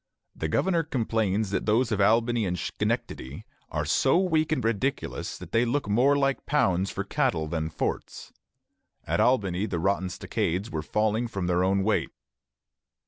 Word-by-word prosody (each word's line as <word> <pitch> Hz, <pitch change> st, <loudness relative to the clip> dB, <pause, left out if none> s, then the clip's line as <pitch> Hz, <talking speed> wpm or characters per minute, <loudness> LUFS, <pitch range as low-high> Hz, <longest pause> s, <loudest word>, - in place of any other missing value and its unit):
The 80 Hz, -, -2 dB
governor 170 Hz, -, +1 dB
complains 110 Hz, -8 st, -1 dB
that 100 Hz, -, -2 dB
those 115 Hz, +3 st, +2 dB
of 105 Hz, -2 st, +1 dB
Albany 115 Hz, +3 st, +3 dB
and 90 Hz, 0 st, -2 dB
Schenectady 75 Hz, -, -3 dB, 0.2 s
"are 75 Hz, -1 st, -2 dB
so 135 Hz, -, +3 dB
weak 160 Hz, -4 st, +1 dB
and 155 Hz, -, 0 dB
ridiculous 115 Hz, +4 st, -2 dB
that -, -, -11 dB
they 115 Hz, -, +3 dB
look 125 Hz, +1 st, -1 dB
more 125 Hz, +7 st, +3 dB
like 135 Hz, -1 st, 0 dB
pounds 95 Hz, -10 st, +2 dB
for -, -, -3 dB
cattle 80 Hz, -, 0 dB
than 80 Hz, 0 st, -2 dB
forts." 80 Hz, -, -4 dB, 0.7 s
At -, -, 0 dB
Albany 100 Hz, -6 st, +2 dB
the 90 Hz, -, -2 dB
rotten 95 Hz, +2 st, 0 dB
stockades 90 Hz, +2 st, -2 dB
were 80 Hz, -1 st, -2 dB
falling 110 Hz, +7 st, 0 dB
from 95 Hz, -5 st, -4 dB
their 90 Hz, 0 st, +2 dB
own 95 Hz, +1 st, +2 dB
weight. 110 Hz, +1 st, +1 dB
105 Hz, 160 wpm, -27 LUFS, 90-125 Hz, 0.7 s, Albany